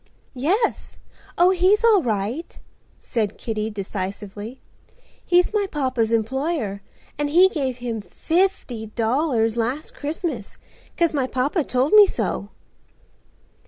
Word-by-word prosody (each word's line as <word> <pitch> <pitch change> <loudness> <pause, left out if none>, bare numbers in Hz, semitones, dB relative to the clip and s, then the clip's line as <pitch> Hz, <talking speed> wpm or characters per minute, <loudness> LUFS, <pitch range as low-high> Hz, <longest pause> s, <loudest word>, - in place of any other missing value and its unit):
"Yes. 355 - -1 0.4
Oh, 355 +1 +5
he's 380 +4 +3
all 440 -5 +6
right," 230 - -3 0.4
said 215 -4 -2
Kitty 220 -1 -3
decisively. 205 +3 -6 0.6
"He's 355 +3 +3
my 410 -2 +1
papa's 255 -7 0
employer 230 - -1 0.4
and 295 0 0
he 355 +5 +6
gave 265 -8 -2
him 235 -3 -4
fifty 250 - -1
dollars 230 0 0
last 250 +7 -2
Christmas, 295 - -4 0.4
'cause 335 -2 +2
my 270 -3 0
papa 280 +6 0
told 260 +5 0
me 420 -1 +9
so." 205 - -2
255 Hz, 115 wpm, -23 LUFS, 220-335 Hz, 0.6 s, me